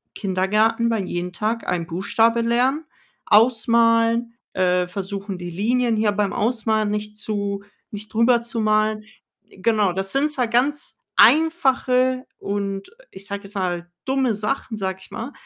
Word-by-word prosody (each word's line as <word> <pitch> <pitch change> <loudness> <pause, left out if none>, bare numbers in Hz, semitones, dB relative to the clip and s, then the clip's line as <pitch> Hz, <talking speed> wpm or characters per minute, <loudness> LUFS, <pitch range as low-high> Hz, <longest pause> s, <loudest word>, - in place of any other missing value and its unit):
Kindergarten 215 +5 +1
war 225 - 0
jeden 180 -1 -3
Tag 220 +4 -2
ein 170 -2 -1
Buchstabe 225 +6 +1
lernen, 255 +6 +1 0.4
ausmalen, 230 +1 +3 0.2
äh, 180 -1 +1
versuchen, 195 +1 -5
die 175 0 -6
Linien 230 +6 0
hier 215 -1 +2
beim 205 -1 -1
Ausmalen 220 -1 0
nicht 210 0 -4
zu 200 -2 -3 0.3
nicht 210 +1 -8
drüber 235 +1 +3
zu 235 -1 -4
malen. 215 0 +1 0.5
Genau, 205 -2 +1
das 195 +1 -3
sind 285 +3 +2
zwar 250 -5 -1
ganz 270 +6 0 0.2
einfache 260 -5 +3
und, 200 -1 -4 0.2
ich 190 +1 -11
sage 200 +1 -5
jetzt 200 +1 -12
mal, 175 -2 -2 0.2
dumme 265 -3 +1
Sachen, 220 +3 -3
sage 190 -1 -3
ich - - -14
mal, 245 +6 -6
215 Hz, 145 wpm, -22 LUFS, 195-235 Hz, 0.5 s, ausmalen